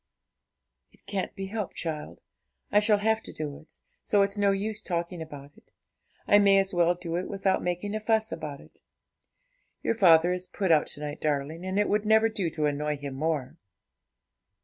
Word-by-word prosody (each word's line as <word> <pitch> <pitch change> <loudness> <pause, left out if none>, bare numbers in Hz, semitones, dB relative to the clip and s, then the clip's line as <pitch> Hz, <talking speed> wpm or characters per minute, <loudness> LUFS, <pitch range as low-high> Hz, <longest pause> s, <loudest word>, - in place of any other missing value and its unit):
'It - - -25
can't 195 -2 -3
be 195 - -4
helped, 210 0 -4
child; 155 - -5 0.5
I 205 - +6
shall 210 0 +3
have 220 +2 +1
to - - -10
do 150 -2 -6
it, 155 - -16 0.3
so 205 -1 +3
it's 200 +1 -2
no 205 -1 +2
use 210 +2 -1
talking 170 -2 -3
about 145 -2 -10
it; - - -23 0.5
I 205 - +6
may 200 -1 +5
as 195 0 +1
well 175 0 +3
do 175 -1 -4
it 180 - -3
without 195 -1 0
making 180 +4 -2
a 215 - -1
fuss 220 0 +1
about 150 -4 -6
it; - - -20 1.0
your - - +1
father 175 -5 +5
is 180 0 -4
put 190 -4 -1
out 155 -2 +4
to 145 - -5
night, 150 0 -5
darling, 150 +3 -2
and 190 +1 -2
it 205 - +3
would 210 0 +1
never 220 +1 +5
do 195 -6 -2
to 155 -1 -2
annoy 150 +1 -1
him 140 -1 -6
more.' 150 -1 -2
180 Hz, 195 wpm, -27 LUFS, 155-205 Hz, 1.0 s, I